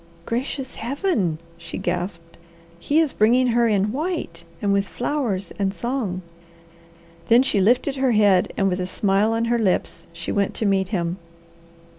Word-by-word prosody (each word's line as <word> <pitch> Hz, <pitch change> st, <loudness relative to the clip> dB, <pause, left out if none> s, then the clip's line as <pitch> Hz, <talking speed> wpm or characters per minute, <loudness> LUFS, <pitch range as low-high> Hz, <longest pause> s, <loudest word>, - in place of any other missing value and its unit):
"Gracious 260 Hz, +2 st, -3 dB
Heaven!" 240 Hz, -, -1 dB, 0.2 s
she 165 Hz, -1 st, -7 dB
gasped. 175 Hz, -2 st, -4 dB, 0.4 s
"He 290 Hz, -, +2 dB
is 320 Hz, -4 st, +1 dB
bringing 245 Hz, +4 st, +3 dB
her 235 Hz, 0 st, +3 dB
in 205 Hz, -1 st, +1 dB
white, 285 Hz, -, -3 dB, 0.2 s
and 200 Hz, +1 st, +1 dB
with 200 Hz, 0 st, +1 dB
flowers 240 Hz, -, -2 dB
and 195 Hz, 0 st, 0 dB
song!" 235 Hz, -8 st, -3 dB, 1.0 s
Then 240 Hz, +3 st, +6 dB
she 210 Hz, -7 st, +1 dB
lifted 250 Hz, +7 st, +2 dB
her 265 Hz, -2 st, +2 dB
head, 205 Hz, -4 st, +4 dB
and 195 Hz, -, +2 dB
with 185 Hz, -1 st, 0 dB
a 180 Hz, -, -2 dB
smile 200 Hz, +3 st, +1 dB
on 225 Hz, +1 st, 0 dB
her 235 Hz, 0 st, +1 dB
lips 195 Hz, -5 st, -1 dB
she 170 Hz, 0 st, -6 dB
went 200 Hz, -1 st, 0 dB
to 220 Hz, -, -1 dB
meet 195 Hz, -2 st, +2 dB
him. 175 Hz, -3 st, -2 dB
210 Hz, 160 wpm, -22 LUFS, 185-245 Hz, 1.0 s, Then